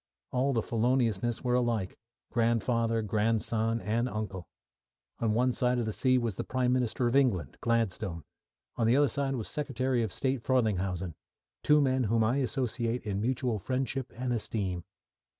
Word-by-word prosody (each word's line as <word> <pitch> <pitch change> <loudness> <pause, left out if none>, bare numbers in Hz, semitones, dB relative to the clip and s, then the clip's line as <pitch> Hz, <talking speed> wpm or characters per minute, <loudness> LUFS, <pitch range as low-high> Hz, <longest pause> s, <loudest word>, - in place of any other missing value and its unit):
All 130 +2 +1
the 115 -4 0
Feloniousness 120 -1 +1
were 125 -1 +1
alike 120 -6 0 0.3
grandfather, 115 -1 +1
grandson, 110 +2 0
and 115 +3 0
uncle. 100 -6 -5 0.7
On 110 -2 +1
one 125 +2 +3
side 125 0 +1
of 120 - 0
the 110 - -2
sea 130 +2 +3
was 115 -6 -1
the - - -2
Prime 125 -1 0
Minister 125 -1 0
of 120 +2 +1
England, 100 - +1
Gladstone; 110 -7 -1 0.5
on 115 - +2
the 120 - +4
other 145 +1 +5
side 135 +2 -1
was 115 -4 -4
Secretary 130 -4 -1
of 110 -4 -1
State 130 +2 -1
Frelinghuysen; 95 -8 0 0.5
two 150 0 +5
men 130 -2 +2
whom 110 +2 +2
I 120 +5 +2
associate 125 -3 -1
in 100 -1 -2
mutual 120 -1 0
friendship 130 +3 -2
and 125 0 -1
esteem. 95 -6 -2
115 Hz, 160 wpm, -30 LUFS, 110-130 Hz, 0.7 s, other